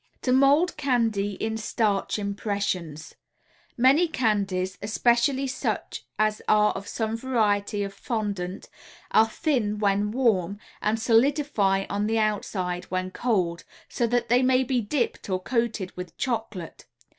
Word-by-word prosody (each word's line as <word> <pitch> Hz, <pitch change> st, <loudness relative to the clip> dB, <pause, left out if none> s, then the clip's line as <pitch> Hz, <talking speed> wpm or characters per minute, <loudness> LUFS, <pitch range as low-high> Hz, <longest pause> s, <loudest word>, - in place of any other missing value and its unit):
TO 250 Hz, -, +1 dB
MOLD 280 Hz, +7 st, +4 dB
CANDY 230 Hz, -8 st, 0 dB
IN 220 Hz, +3 st, -3 dB
STARCH 210 Hz, -2 st, 0 dB
IMPRESSIONS 200 Hz, -6 st, -3 dB, 0.6 s
Many 270 Hz, +8 st, +5 dB
candies, 200 Hz, -, -1 dB
especially 240 Hz, +5 st, +2 dB
such 260 Hz, -1 st, -3 dB
as 215 Hz, 0 st, +1 dB
are 210 Hz, 0 st, +4 dB
of 195 Hz, +1 st, -7 dB
some 220 Hz, 0 st, -2 dB
variety 210 Hz, -4 st, 0 dB
of 200 Hz, 0 st, -5 dB
fondant, 200 Hz, -4 st, -4 dB, 0.4 s
are 220 Hz, +1 st, +5 dB
thin 220 Hz, -6 st, 0 dB
when 205 Hz, 0 st, +1 dB
warm 205 Hz, -6 st, +1 dB, 0.2 s
and 215 Hz, +1 st, 0 dB
solidify 225 Hz, -5 st, +2 dB
on 205 Hz, +1 st, -1 dB
the 225 Hz, +1 st, +1 dB
outside 190 Hz, -4 st, -1 dB
when 185 Hz, 0 st, -3 dB
cold, 185 Hz, -8 st, -1 dB, 0.3 s
so 240 Hz, -, 0 dB
that 240 Hz, 0 st, 0 dB
they 245 Hz, +2 st, +4 dB
may 260 Hz, 0 st, +3 dB
be 250 Hz, -1 st, 0 dB
"dipped" 235 Hz, 0 st, -2 dB
or 185 Hz, -1 st, 0 dB
coated 225 Hz, -2 st, -2 dB
with 180 Hz, -1 st, -8 dB
chocolate. 220 Hz, -8 st, -4 dB
215 Hz, 135 wpm, -26 LUFS, 200-245 Hz, 0.6 s, Many